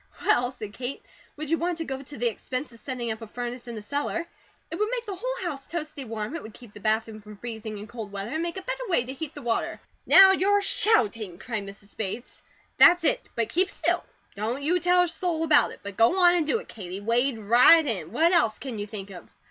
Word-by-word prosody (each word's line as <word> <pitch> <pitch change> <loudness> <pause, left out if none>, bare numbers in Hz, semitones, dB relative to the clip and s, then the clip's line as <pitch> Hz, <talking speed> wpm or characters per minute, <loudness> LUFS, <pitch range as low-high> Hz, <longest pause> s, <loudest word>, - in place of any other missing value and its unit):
"Well," 245 0 +3
said 215 -5 -8
Kate, 250 +4 -5 0.3
"would 305 0 -6
you 330 - +2
want 345 0 -1
to 325 - -3
go 265 -2 -4
to 280 +1 -10
the 240 - -2
expense 255 +4 -4
of 230 - -14
setting 240 -1 -4
up 220 +1 -6
a 225 - -7
furnace 245 +2 -6
in 235 - -6
the 215 - -7
cellar? 290 +7 -2 0.5
It - - -3
would 425 +2 0
make 485 -1 -3
the 410 - -4
whole - - -3
house 275 -5 -6
toasty 305 -5 -5
warm; 220 +5 -4
it 330 - -4
would 220 - -11
keep 240 -4 -14
the - - -11
bathroom 220 +1 -1
from 210 0 -12
freezing 220 -1 -6
in 205 - -7
cold 225 -3 -8
weather; 200 +2 -5
and 315 +2 -1
make 340 +1 -3
a 380 - -5
better - - -4
way 340 - +2
to 260 - -5
heat 295 +2 -7
the 290 - -8
water." 235 -1 -1 0.3
"Now 385 0 +9
you're 400 +2 +3
shouting!" 220 - +1
cried 215 -2 -5
Mrs. 200 0 -12
Bates. 220 +3 -5 0.4
"That's 350 0 +7
it! - - 0
But 230 -1 -1
keep 365 +9 +2
still. - - 0 0.3
Don't 230 +7 -3
you 350 +5 +2
tell 360 +1 +4
a - - 0
soul 335 -1 -1
about 305 -2 +5
it, - - -12
but 200 -1 -8
go 230 +11 +4
on 350 -1 +6
and 335 -4 +1
do 385 - +2
it, 460 - -9
Katie. 190 -3 -7
Wade 235 +4 +1
right 245 +10 +6
in! 185 - -3
What 335 +2 +3
else 230 - +3
can 250 -6 -6
you 205 - -4
think 200 -2 -7
of?" 175 -3 -11
250 Hz, 245 wpm, -26 LUFS, 220-335 Hz, 0.5 s, Now